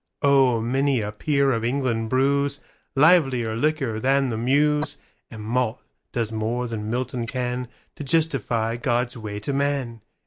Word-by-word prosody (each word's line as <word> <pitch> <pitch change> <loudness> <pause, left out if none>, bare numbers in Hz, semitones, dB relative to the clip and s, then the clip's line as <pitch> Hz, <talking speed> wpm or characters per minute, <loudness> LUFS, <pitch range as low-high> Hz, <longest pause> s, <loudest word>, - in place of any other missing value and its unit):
Oh 135 -4 +4
many 135 +3 +1
a 105 0 -3
peer 140 +5 +1
of 115 -2 -1
England 120 -3 -1
brewsLivelier 140 -1 +2
liquor 135 -4 0
than 135 +2 +2
the 115 - -2
Muse, 150 +1 +2 0.3
And 110 -2 -9
malt 120 +1 -1 0.3
does 115 -2 -2
more 115 +3 -2
than 110 -2 -5
Milton 125 0 -2
canTo 125 0 -3 0.4
justify 130 -7 0
God's 120 +1 -1
ways 105 -3 -6
to 140 - -2
man. 135 -5 -1
125 Hz, 135 wpm, -24 LUFS, 115-140 Hz, 0.4 s, Oh